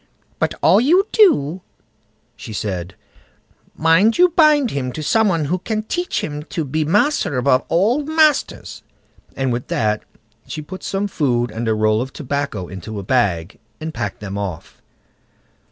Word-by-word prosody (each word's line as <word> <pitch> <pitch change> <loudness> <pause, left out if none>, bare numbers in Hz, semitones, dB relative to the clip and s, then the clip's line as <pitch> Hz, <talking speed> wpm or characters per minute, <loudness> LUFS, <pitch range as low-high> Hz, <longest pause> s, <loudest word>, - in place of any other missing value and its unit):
"But - - 0
all 215 - +6
you 350 +10 +4
do", 185 - +3 0.7
she 110 - -9
said, 95 -4 -4 0.8
"mind 165 +8 +4
you 360 +1 +6
bind 305 -6 +4
him 130 -2 -3
to 155 - -5
some 220 +8 +3
one 165 -5 0
who 180 +6 -1
can 215 +3 -3
teach 355 +10 -2
him 150 -1 -4
to 165 -2 -4
be 155 +3 -1
master 195 - +1
above 130 0 +2
all 220 - +2
masters"; 310 -1 +1 0.5
and 130 -2 -1
with 120 +1 -4
that 105 -1 0 0.5
she 155 - -6
put 185 +5 -9
some 200 +1 -2
food 125 -10 0
and 115 +1 -4
a 110 - +2
roll 110 +1 +2
of 130 +1 -6
tobacco 140 - -3
into 95 +4 -8
a 100 - -5
bag, 95 -8 0 0.2
and 160 0 -5
packed 105 -8 -4
them 100 -1 -5
off. 90 -5 -6
145 Hz, 160 wpm, -19 LUFS, -, 0.8 s, all